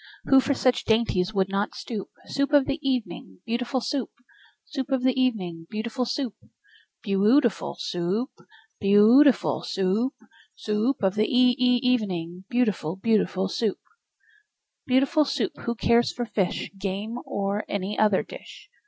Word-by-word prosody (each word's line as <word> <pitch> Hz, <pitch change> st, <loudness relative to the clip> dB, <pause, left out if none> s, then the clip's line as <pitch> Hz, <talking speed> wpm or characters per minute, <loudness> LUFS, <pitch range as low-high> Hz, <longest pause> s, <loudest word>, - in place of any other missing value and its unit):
Who 270 Hz, -, +5 dB
for 280 Hz, +1 st, 0 dB
such 255 Hz, -1 st, +1 dB
dainties 220 Hz, -4 st, +1 dB
would 195 Hz, -3 st, +1 dB
not 195 Hz, +1 st, -2 dB
stoop? 215 Hz, -5 st, -6 dB, 0.2 s
Soup 280 Hz, +1 st, -2 dB
of 285 Hz, -2 st, +5 dB
the 275 Hz, +3 st, -2 dB
evening, 230 Hz, -, -3 dB
beautiful 245 Hz, +3 st, -2 dB
Soup! 270 Hz, -1 st, -2 dB, 0.6 s
Soup 270 Hz, -3 st, -5 dB
of 265 Hz, -2 st, 0 dB
the 260 Hz, 0 st, +3 dB
evening, 185 Hz, -11 st, -1 dB
beautiful 235 Hz, +4 st, -3 dB
Soup! 250 Hz, -2 st, -3 dB, 0.7 s
Beau 195 Hz, -3 st, 0 dB
ootiful 235 Hz, +3 st, +2 dB
Soo 175 Hz, -, -4 dB, 0.2 s
oop! 255 Hz, -, -6 dB, 0.5 s
Beau 205 Hz, 0 st, +5 dB, 0.2 s
ootiful 280 Hz, -4 st, +3 dB
Soo 190 Hz, -1 st, -1 dB
oop! 265 Hz, -, -5 dB, 0.4 s
Soo 210 Hz, -1 st, -2 dB
oop 275 Hz, -5 st, -1 dB
of 190 Hz, -1 st, +2 dB
the 215 Hz, +1 st, +1 dB
e 250 Hz, 0 st, +4 dB
e 250 Hz, 0 st, +2 dB
evening, 185 Hz, -8 st, -1 dB
Beautiful, 210 Hz, -9 st, 0 dB
beautiful 195 Hz, -2 st, +1 dB
Soup! 210 Hz, +1 st, -1 dB, 1.1 s
Beautiful 270 Hz, +4 st, +3 dB
Soup! 325 Hz, +5 st, -1 dB
Who 235 Hz, -, -1 dB
cares 235 Hz, +1 st, +2 dB
for 240 Hz, -, -4 dB
fish, 195 Hz, -5 st, -2 dB
Game, 200 Hz, +5 st, -4 dB
or 200 Hz, +1 st, -2 dB
any 200 Hz, +1 st, -3 dB
other 210 Hz, -3 st, +3 dB
dish? 425 Hz, -4 st, -12 dB
230 Hz, 155 wpm, -25 LUFS, 195-255 Hz, 1.1 s, Who